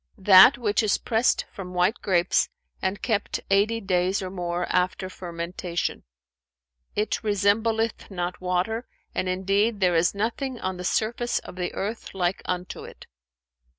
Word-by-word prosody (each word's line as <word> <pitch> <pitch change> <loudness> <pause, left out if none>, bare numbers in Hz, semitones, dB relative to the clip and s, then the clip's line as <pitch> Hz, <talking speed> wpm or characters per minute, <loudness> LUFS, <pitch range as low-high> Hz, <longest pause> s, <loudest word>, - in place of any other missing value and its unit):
"That 190 +4 +8
which 215 -3 +1
is 215 -3 +2
pressed 230 +2 +1
from 180 -2 -8
white 180 +5 +2
grapes 175 - +2 0.3
and 190 +1 -2
kept 220 -4 0
eighty 210 +4 +3
days 185 -1 +1
or 185 - -5
more 175 -1 -2
after 185 +1 0
fermentation: 170 0 -4 0.9
it 210 +1 0
resembleth 220 +2 +1
not 180 -2 -4
water 185 +6 -1 0.3
and 185 - -1
indeed 200 +4 +1
there 180 -2 +3
is 170 +4 +2
nothing 240 +4 -2
on 185 -1 -3
the 180 - -6
surface 230 +5 0
of - - -7
the 180 -1 -3
earth 215 +2 -4
like 180 0 0
unto 180 0 -4
it." - - -12
190 Hz, 145 wpm, -25 LUFS, 180-215 Hz, 0.9 s, That